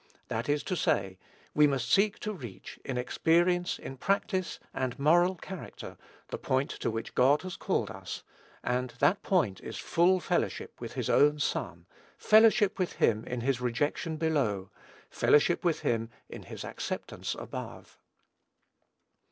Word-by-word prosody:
That 115 +5 -2
is 145 0 +1
to 185 - -2
say, 145 - 0 0.3
we 150 0 +6
must 130 -3 -1
seek 200 +1 +4
to 215 - -3
reach, 120 - -9
in 130 - -3
experience, 175 +8 +2
in 135 - -8
practice, 190 +2 -1
and 130 -1 -2
moral 175 +6 +4
character, 185 0 -8 0.3
the - - -4
point 130 +2 0
to - - -2
which 115 0 -4
God 140 +6 +4
has 185 -1 -5
called - - -1
us, - - -7 0.4
and 125 0 -1
that 145 +10 +3
point 160 - +1
is - - -7
full 180 +2 +3
fellowship 170 - -2
with - - -6
his - - -2
own 150 +1 +4
Son, 145 - -2 0.3
fellowship 215 -2 +5
with 185 - 0
him 110 -1 +2
in 125 -1 -4
his 130 0 0
rejection 145 +6 -1
below, 135 - 0 0.4
fellowship 150 +4 +3
with 170 -3 +1
him 115 -1 0 0.2
in - - -9
his - - -8
acceptance - - -4
above. - - -8
150 Hz, 150 wpm, -30 LUFS, 125-180 Hz, 0.4 s, we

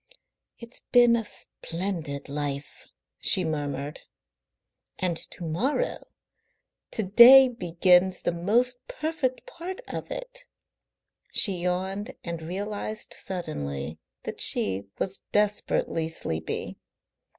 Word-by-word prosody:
"It's 235 +1 -8
been 240 -1 +6
a 230 - 0
splendid 165 -7 -5
life," 145 0 -4 0.3
she 185 - +4
murmured, 145 -2 -3 1.0
"and 180 -2 0
to 175 - -2
morrow 240 - -1 0.8
to 220 - -1
day 245 +7 +9
begins 180 -4 +3
the - - 0
most 235 +9 +1
perfect 310 - -2
part 375 -6 -7
of - - -6
it." - - -6 0.9
She 200 - +4
yawned 190 +6 -2
and 170 -1 -4
realised 205 +5 -4
suddenly 75 - -4 0.2
that - - -5
she 100 0 +2
was 195 0 -2
desperately 205 -5 +1
sleepy. 80 - -4
185 Hz, 100 wpm, -27 LUFS, 160-235 Hz, 1.0 s, day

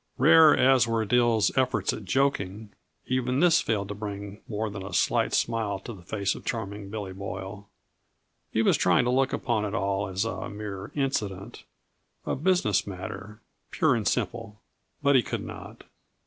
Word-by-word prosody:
Rare 160 +2 +7
as 130 -3 +4
were 115 -1 0
Dill's 120 -1 +2
efforts 130 -1 +1
at 105 - -7
joking, 105 -3 -1 0.3
even 130 0 0
this 165 0 +5
failed 105 -3 -1
to - - -3
bring 100 0 -7
more 110 0 -2
than 100 -2 -6
a 95 - -6
slight - - +2
smile 110 -4 0
to 115 +5 -8
the 95 - -12
face 100 +2 -1
of - - -10
Charming 105 -3 -4
Billy 100 -3 -5
Boyle. 95 +1 -7 0.8
He 110 - +1
was - - +4
trying 90 +6 +3
to 125 - +1
look 130 +1 +2
upon 110 -3 -1
it 105 +1 -3
all 100 -1 -1
as 95 +3 -2
a 115 - -4
mere 100 -1 -7
incident, 105 -9 -3 0.6
a - - -1
business 155 - +1
matter, 100 +3 -7 0.3
pure 155 -4 +2
and 115 -4 -1
simple, 115 -1 -2 0.4
but 140 -1 +4
he 130 - +6
could 105 - -4
not. - - -10
105 Hz, 170 wpm, -27 LUFS, 100-125 Hz, 0.8 s, Rare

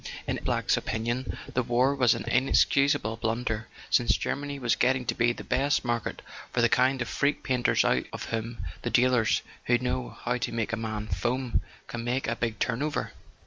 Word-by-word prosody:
In - - -2
M. - - -17
Black's - - +1
opinion 120 +3 -2 0.2
the 125 - +2
war 125 +3 +2
was 125 -4 +4
an - - -4
inexcusable 130 -2 +3
blunder, 110 -1 -2 0.2
since 120 - +4
Germany 145 0 -3
was 125 -4 +1
getting 130 0 +2
to 120 - 0
be 120 +1 +2
the - - -7
best 140 0 +1
market 120 -1 -2 0.3
for - - -1
the 120 - +4
kind 130 +1 +3
of - - -9
freak 140 +4 0
painters 125 -2 +2
out - - +2
of - - -6
whom 115 -2 -3 0.2
the 120 - -2
dealers 125 -2 +3 0.2
who 120 - +4
"know 125 0 -3
how 125 +1 0
to 125 - -2
make 115 0 -2
a - - +3
man 110 -1 -4
'foam' 120 +7 -1
" - - -27
can 120 -1 -5
make 125 +3 -1
a 115 - 0
big 115 -2 -2
turn 120 +1 -1
over. 150 0 -2
120 Hz, 200 wpm, -28 LUFS, 115-130 Hz, 0.3 s, was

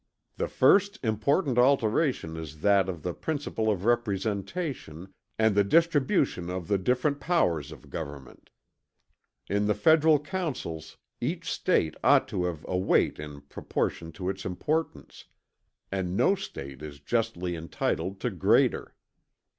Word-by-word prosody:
"The - - -1
first 200 +1 +4
important 125 - +1
alteration 125 - +2
is 80 -2 -8
that 100 -1 +3
of 85 -5 -6
the 90 - -2
principle 145 - -2
of 100 -2 -1
representation 100 - -2 0.2
and 110 -1 +3
the 100 0 +4
distribution 145 - +2
of 90 -2 -4
the 100 -2 +1
different 125 +8 +1
powers 85 - +1
of 75 -5 -13
government. 70 -5 -8 1.0
In 100 +1 0
the 105 - +2
federal 160 -2 +5
councils, 145 - -5 0.2
each - - -3
State 80 -1 +1
ought - - +5
to 90 - -1
have 85 -4 -4
a - - -2
weight 95 - +2
in 75 -1 -8
proportion 80 +3 -3
to 90 +3 -5
its 95 0 -3
importance; 95 - -3 0.7
and 95 -1 -2
no - - +4
State 70 - -7
is 75 -2 -8
justly 90 -1 -1
entitled 85 +3 -3
to 125 - -1
greater. 90 -5 +2
100 Hz, 135 wpm, -28 LUFS, 85-135 Hz, 1.0 s, federal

